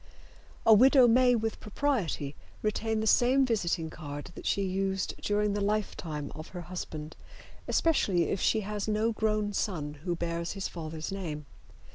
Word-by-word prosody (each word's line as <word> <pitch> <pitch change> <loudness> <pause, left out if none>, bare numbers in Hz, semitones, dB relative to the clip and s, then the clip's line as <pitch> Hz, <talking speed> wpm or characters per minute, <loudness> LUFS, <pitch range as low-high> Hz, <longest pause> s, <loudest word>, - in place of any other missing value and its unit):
A 225 - +8
widow 255 +3 +7
may 245 +1 +5
with 225 -1 -2
propriety 205 - -1 0.3
retain 220 +1 0
the - - -1
same 255 +4 +4
visiting 175 -8 -1
card 145 -3 -7
that - - -7
she 200 - +1
used 190 0 -1
during 210 0 +1
the 205 - -1
lifetime 185 -8 -2
of 155 +2 -8
her 180 - -7
husband, 160 -3 -6 0.5
especially 200 - +2
if 195 - -1
she 220 - +2
has 210 0 -4
no 215 +2 +1
grown 215 -1 0
son 150 -8 -2
who 175 -1 -1
bears 170 0 -3
his 195 -1 -3
father's 160 -1 -6
name. 160 -7 -5
195 Hz, 155 wpm, -29 LUFS, 170-220 Hz, 0.5 s, A